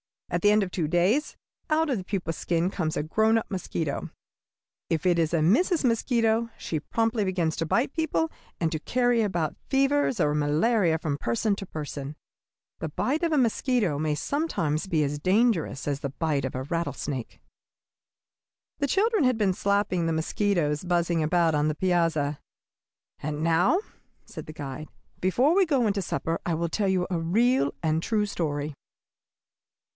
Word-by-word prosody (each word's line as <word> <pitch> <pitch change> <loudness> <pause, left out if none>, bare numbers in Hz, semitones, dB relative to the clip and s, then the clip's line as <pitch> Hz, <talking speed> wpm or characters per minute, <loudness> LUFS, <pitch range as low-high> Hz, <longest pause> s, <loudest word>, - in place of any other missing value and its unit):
At - - 0
the 205 - +5
end 210 0 +4
of 185 - -5
two 165 -4 -1
days 185 - +1 0.3
out 315 0 +2
of 260 - +1
the 190 - -5
pupa 185 -4 -2
skin 170 +3 -1
comes 165 -3 -2
a - - 0
grown 220 +8 +2
up 225 - -4
mosquito. 165 -5 -3 0.8
If 160 0 -1
it 175 -2 +3
is 160 -2 +1
a 165 - +3
Mrs. 275 - +3
Mosquito, 230 -1 +1
she 155 - -3
promptly 225 +6 0
begins 180 -4 0
to 165 - -1
bite 245 - +1
people 320 0 0 0.3
and 165 -2 0
to 155 - -2
carry 245 +5 +1
about 175 -7 -1
fevers 275 -2 +2
or 150 - +2
malaria 160 +5 +2
from 155 -3 -2
person 130 - 0
to 195 - -7
person. 145 -2 -6 0.6
The 160 - -3
bite 285 - -1
of 335 - +1
a - - +3
mosquito 235 - +1
may 155 -1 0
sometimes 170 - -1
be 160 -5 +1
as 145 +1 -2
dangerous 185 - +1
as 140 -1 -1
the 140 - -3
bite 140 -1 -1
of 130 - -4
a 130 - -3
rattlesnake." 145 -4 -4 1.4
The 285 - +1
children 410 - +2
had 255 -2 +2
been 200 -4 +2
slapping 200 -3 0
the 165 - 0
mosquitoes 160 -2 0
buzzing 170 -1 +1
about 165 +1 +2
on 150 0 +2
the 155 - 0
piazza. 165 -5 +1 0.8
"And 150 +1 -3
now," 170 - +3 0.5
said - - -9
the 155 - -8
guide, 145 0 -6 0.3
"before 245 - +3
we 385 +1 +4
go 275 -7 +2
into 200 -2 +1
supper, 165 -2 -2
I 170 - 0
will 170 +1 -1
tell 200 +4 0
you 185 -2 +1
a 175 - 0
real 200 - +2
and 155 -1 +2
a - - -1
true 210 +2 0
story. 150 -6 -3
175 Hz, 175 wpm, -26 LUFS, 155-225 Hz, 1.4 s, the